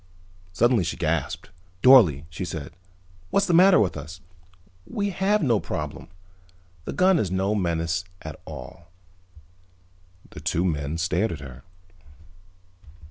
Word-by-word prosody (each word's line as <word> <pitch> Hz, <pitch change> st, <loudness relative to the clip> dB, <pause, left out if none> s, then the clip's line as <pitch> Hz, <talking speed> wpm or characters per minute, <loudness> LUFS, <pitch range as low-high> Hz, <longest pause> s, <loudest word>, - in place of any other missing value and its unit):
Suddenly 115 Hz, +3 st, +2 dB
she 85 Hz, -, -3 dB
gasped. -, -, -2 dB, 0.3 s
"Dorle," 95 Hz, -, +6 dB
she 90 Hz, -, -5 dB
said. 80 Hz, -5 st, -6 dB, 0.6 s
"What's 200 Hz, -, +2 dB
the 180 Hz, -, 0 dB
matter 185 Hz, 0 st, +7 dB
with 95 Hz, -5 st, +1 dB
us? 80 Hz, +3 st, -8 dB, 0.7 s
We 200 Hz, -1 st, -2 dB
have 195 Hz, +2 st, +1 dB
no 120 Hz, -7 st, +2 dB
problem. -, -, -5 dB, 0.8 s
The -, -, -4 dB
gun 185 Hz, -1 st, +3 dB
is 100 Hz, -, -1 dB
no 95 Hz, +3 st, 0 dB
menace 85 Hz, -3 st, -1 dB, 0.2 s
at 80 Hz, -2 st, -8 dB
all." 85 Hz, -, -10 dB, 1.4 s
The -, -, -9 dB
two 85 Hz, +3 st, -1 dB
men 75 Hz, -2 st, -2 dB
stared 90 Hz, +6 st, 0 dB
at 80 Hz, -, -7 dB
her. 65 Hz, -2 st, -10 dB
90 Hz, 130 wpm, -24 LUFS, 80-130 Hz, 1.4 s, matter